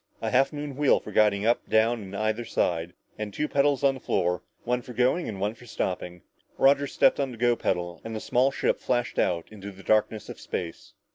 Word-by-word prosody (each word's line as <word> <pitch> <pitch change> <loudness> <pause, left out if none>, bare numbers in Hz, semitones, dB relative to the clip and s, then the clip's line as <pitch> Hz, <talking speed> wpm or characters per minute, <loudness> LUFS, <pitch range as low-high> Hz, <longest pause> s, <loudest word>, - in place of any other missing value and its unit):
A - - -2
half 135 +2 +3
moon 145 -2 -5
wheel 145 -2 +4
for - - -10
guiding, 105 -1 +3
up, 120 +1 +1
down 110 +1 +3
and 100 0 -8
either 110 +2 -1
side, 85 -6 -1 0.3
and 105 -1 -4
two 150 +9 -2
pedals 140 -1 +2
on 135 -1 +5
the 130 - -9
floor, 90 -6 0 0.2
one 125 +1 0
for 125 - -10
going 125 +7 +1
and 100 -3 -6
one 105 +2 -1
for 120 +2 -16
stopping. 90 -4 -4 0.3
Roger 140 +1 +4
stepped - - +3
on 140 -1 0
the 120 - -9
"Go" 120 +1 +3
pedal 90 -5 -2
and 115 0 -6
the - - -3
small 130 +4 +2
ship 140 - 0
flashed 120 0 -1
out 85 -2 0
into 100 -2 -8
the 95 0 -14
darkness 110 +1 +1
of - - -9
space. 85 -2 -6
115 Hz, 220 wpm, -27 LUFS, 100-130 Hz, 0.3 s, on